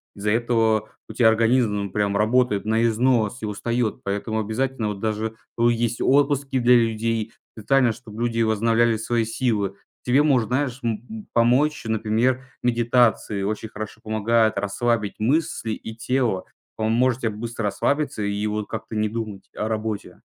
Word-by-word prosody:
Из-за 105 +1 -2
этого 115 -2 +1 0.2
у - - -7
тя 120 - +4
организм 110 -3 +2
прям 100 -1 0
работает 110 0 +2
на 110 +1 +2
износ 115 0 +1
и - - -3
устаёт. 110 +2 -2
Поэтому 105 +3 -2
обязательно 110 +1 -1
вот 100 -2 -5
даже, 110 +1 -2 0.3
э, - - +2
есть 120 0 -1
отпуски 140 -1 +2
для 125 0 +5
людей 115 -1 0 0.2
специально, 125 +2 +3
чтоб 110 -1 -11
люди 115 -1 0
возобновляли 115 +1 +2
свои 115 +1 0
силы. 110 -4 -1 0.3
Тебе 125 +3 +3
может, 130 -7 +2
знаешь, 130 0 -1
м 115 -1 -2
м, 220 -2 -8
помочь, 125 +6 +3
например, 110 +4 +1 0.2
медитации. 120 -3 +2
Очень 110 +2 -3
хорошо 105 0 -8
помогают 110 +1 +1
расслабить 105 +1 -1
мысли 125 -1 0
и 110 +1 -6
тело. 115 -5 0 0.3
Поможет 120 +3 +1
тебе 115 - +1
быстро 115 +2 -5
расслабиться 140 +4 0
и 100 +1 -1
вот 105 0 -3
как-то - - -6
не 110 0 +1
думать 110 -3 -6
о 105 - -2
работе. 110 -1 -4
115 Hz, 155 wpm, -23 LUFS, 110-120 Hz, 0.3 s, для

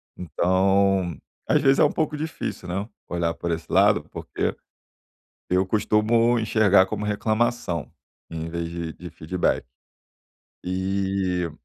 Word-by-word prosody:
Então 95 +1 +1 0.3
às - - +3
vezes 135 0 +4
é - - +6
um - - +4
pouco 155 -1 -1
difícil, 155 - -5
né, 100 +5 -3 0.2
olhar 85 -1 -1
por 85 - -3
esse 80 -1 -4
lado, - - +4
porque - - -3 1.0
eu 90 +1 +2
costumo 110 +4 +2
enxergar 105 -4 +4
como 105 +2 -4
reclamação, 105 - -1 0.4
em 80 0 -5
vez 85 0 -4
de 85 -1 -5
de 90 -1 -10
feedback. 85 -2 -1 1.0
E 95 -2 -1
95 Hz, 125 wpm, -24 LUFS, 85-105 Hz, 1.0 s, é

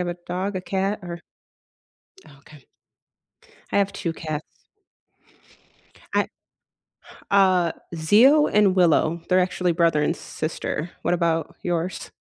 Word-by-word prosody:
have 175 - -3
a - - -36
dog, 185 +2 -3
a - - -2
cat, 195 +3 -2
or 170 -1 -7 1.2
Okay. 145 -1 -18 1.1
I - - +3
have 200 0 +1
2 170 -4 -3
cats. 155 -2 -5 1.7
I - - +2 1.0
Uh, 185 -4 +4 0.2
Zeo 235 - +5
and 205 -3 +4
Willow- 170 -2 +3
they're 185 - +4
actually 180 -1 +1
brother 165 -3 +2
and - - 0
sister. 155 +1 -4
What - - +1
about 165 -2 -1
yours? 175 +1 -3
175 Hz, 120 wpm, -23 LUFS, 165-190 Hz, 1.7 s, Zeo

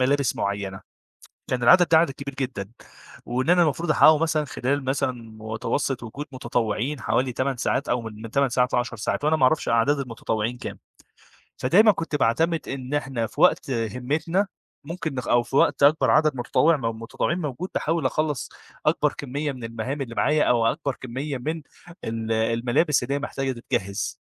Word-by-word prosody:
ملابس 140 +1 +2
معيّنة، 100 -1 -3 0.7
كان 125 -1 -1
العدد 175 +8 +6
ده 160 - +6
عدد 165 -2 +3
كبير 140 0 -7
جدًا، 125 -7 -4 0.6
وإن 130 +5 0
أنا 180 0 +6
المفروض 165 +1 0
أحققه 155 0 +6
مثلًا 155 -1 +1
خلال 140 +1 -2
مثلًا 130 0 0 0.3
متوسط 115 +4 -2
وجود 130 +6 -7
متطوعين 125 +1 -2
حوالي 125 +4 0
8 130 +2 -1
ساعات، 130 +3 -1
أو 120 - +1
من 110 0 -8
8 140 +3 +2
ساعات 125 +1 +1
ل10 120 -1 0
ساعات، 110 +6 -2
وأنا 155 +1 +3
ما 155 - -3
أعرفش 155 +4 +2
أعداد 115 +5 +3
المتطوعين 115 -2 -3
كام، - - -7 0.8
فدايمًا 205 - +5
كنت 165 -5 -4
باعتمد 160 +6 +1
إن 135 0 -5
إحنا 135 -6 -1
في - - -6
وقت - - +4
همّتنا 130 - -1 0.4
ممكن 160 -1 -5
نخ 125 - -4
أو 120 0 +3
في 120 +3 -7
وقت 140 - +3
أكبر 150 +3 +5
عدد 155 -2 +3
متطوع 150 +6 +2
م - - -10 0.2
متطوعين 145 +8 -2
موجود، 160 +3 -4
باحاول 165 +1 0
أخلّص 150 -6 -1 0.4
أكبر - - +2
كمية 145 +2 -3
من 130 -3 -9
المهام 115 +5 -4
اللي 115 -3 -5
معايا، 150 +5 +3
أو 120 -2 +3
أكبر 135 +3 -1
كمية 130 +3 -4
من 155 +6 -3 0.4
ال 115 0 -3
الملابس 115 +6 +1
اللي 130 +3 -2
هي - - -1
محتاجة 135 -2 -3
تتجهز. 100 -5 -3
130 Hz, 175 wpm, -24 LUFS, 115-150 Hz, 0.8 s, العدد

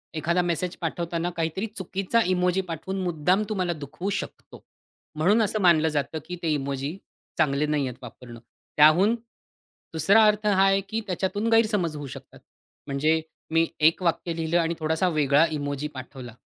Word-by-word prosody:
एखादा 170 +3 +1
मेसेज 175 +1 -2
पाठवताना 170 0 -2
काहीतरी 165 +6 -2
चुकीचा 195 +4 0
इमोजी 180 +1 +1
पाठवून 185 +2 -5
मुद्दाम 180 +3 +1
तुम्हाला 185 -4 -1
दुखवू 155 +5 -6
शकतो. - - -12 0.5
म्हणून 190 +9 +3
असं 215 0 0
मानलं 165 -3 +4
जातं, 150 +1 -2
की 180 +2 -6
ते 165 - 0
इमोजी 140 +3 -3 0.4
चांगले 150 -2 +2
नाहीयेत 145 -4 -1
वापरणं. 120 -1 -11 0.4
त्याहून 170 +9 +6 0.8
दुसरा 195 +8 +5
अर्थ 210 0 +1
हा 195 -2 +4
आहे, 195 0 +3
की 225 0 -1
त्याच्यातून 195 +4 -2
गैरसमज 210 -8 +2
होऊ 145 -1 -6
शकतात. - - -11 0.5
म्हणजे 155 +4 +1 0.3
मी 165 0 +4 0.2
एक 165 - +1
वाक्य 170 0 0
लिहिलं 165 +1 0
आणि 165 0 0
थोडासा 160 +3 0
वेगळा 150 -1 +3
इमोजी 145 -1 -3
पाठवला 130 -2 -9
165 Hz, 150 wpm, -25 LUFS, 150-190 Hz, 0.8 s, त्याहून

